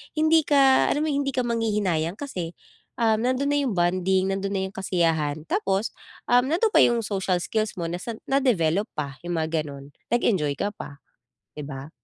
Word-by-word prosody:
hindi 315 0 +4
ka 275 -2 +5
alam 295 - +1
mo, 315 - 0
'yung 285 -1 0
hindi 275 - -2
ka 255 - +1
manghihinayang 210 -8 0
kasi, 185 - -5 0.5
um, 220 -1 +3
nando'n 255 +4 0
na 290 - +2
'yong 240 - -1
bonding, 185 +2 +1
nando'n 195 +1 -2
na 195 - 0
'yong 190 - -21
kasiyahan, 165 -5 0
tapos, 195 +1 0 0.4
um, 245 +1 +5
nando'n 345 +10 +2
pa - - +3
'yong 235 -1 +4
social 190 -3 -1
skills 215 +2 -1
mo, 165 - -2
nasan 195 +6 -5
na-develop 210 - +2
pa, 140 -3 -4
'yong 175 - -3
mga 160 0 -1 0.2
gano'n. 140 -1 -9 0.3
Nag-enjoy 190 -11 +2
ka 205 - -1
pa, 145 -8 -10 0.6
'di 150 - -5
ba? 135 0 -7
195 Hz, 185 wpm, -25 LUFS, 170-250 Hz, 0.6 s, ka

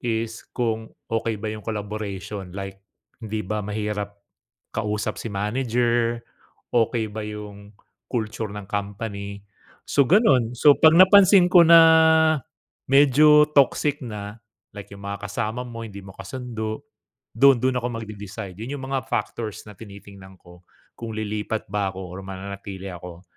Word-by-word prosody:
is 115 -1 -3
kung 115 -2 -1 0.2
okey 115 -1 -1
ba 110 -1 -3
yung 105 - -9
collaboration 105 -3 -5
like 95 0 -7 0.4
hindi 110 -2 -4
ba 105 +2 -2
mahirap 105 -1 -4 0.6
kausap 105 0 -2
si - - -6
manager, 120 +2 0 0.5
okey 115 -1 +1
ba 110 +1 -6
yung 105 -1 -9 0.4
culture 110 -2 -3
ng 105 -1 -8
company, 100 0 -5 0.4
so 140 - +3
ganun. 135 - +4
So, 145 +3 +6
'pag 160 0 +6
napansin 190 0 +7
ko 180 -1 +8
na 165 0 +9 1.1
medyo 150 +2 +6
toxic 145 +1 +2
na, 105 0 -8 0.3
like 100 -1 -10
yung 100 0 -11
mga 100 0 -5
kasama 110 +4 -3
mo 115 -1 -8
hindi 100 -1 -9
mo 95 - -11
kasundo, 110 +1 -6 0.5
dun 135 +2 +6
dun 130 -1 +1
ako 120 0 -2
magde-decide. 105 -2 -8
Yun 120 +6 -5
yung 135 - -7
mga 135 -1 -2
factors 110 -5 -3
na 105 - -11
tinitingnan 100 -2 -13
ko 90 +1 -18 0.3
kung 115 -1 -6
lilipat 110 0 -3
ba 100 -1 -1
ako 95 - -7 0.2
or - - -7
mananatili 95 0 -7
ako 90 0 -10
110 Hz, 140 wpm, -23 LUFS, 100-120 Hz, 1.1 s, na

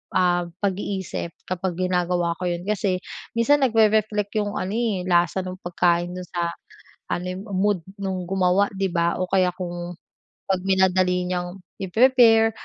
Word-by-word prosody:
ah, 175 -1 +3 0.2
pag-iisip 190 -3 -2 0.2
kapag 185 -1 -2
ginagawa 180 -2 0
ko 180 - -3
yun. 175 0 -2
Kasi 195 -3 0 0.3
minsan 285 +5 +3
nag-rereflect 215 -3 +2
yung 205 -1 -1
ano, 185 - -2
eh, 225 -5 0
lasa 175 +1 +2
nung 185 0 -6
pagkain 175 0 +1
dun 180 0 -6
sa 170 -1 -2 0.6
ano, 180 - -2
eh, 185 - -5
mood 200 -1 0 0.2
nung 190 -2 -2
gumawa, 190 +2 +2
di 195 0 0
ba? 170 -1 +1
O 185 - -1
kaya 185 -2 +3
kung 175 -1 -6 0.5
pag 185 -1 +1
minadali 185 -1 +2
niyang 180 +1 -4 0.2
i-prepare, 225 +2 +5
185 Hz, 145 wpm, -23 LUFS, 175-205 Hz, 0.6 s, i-prepare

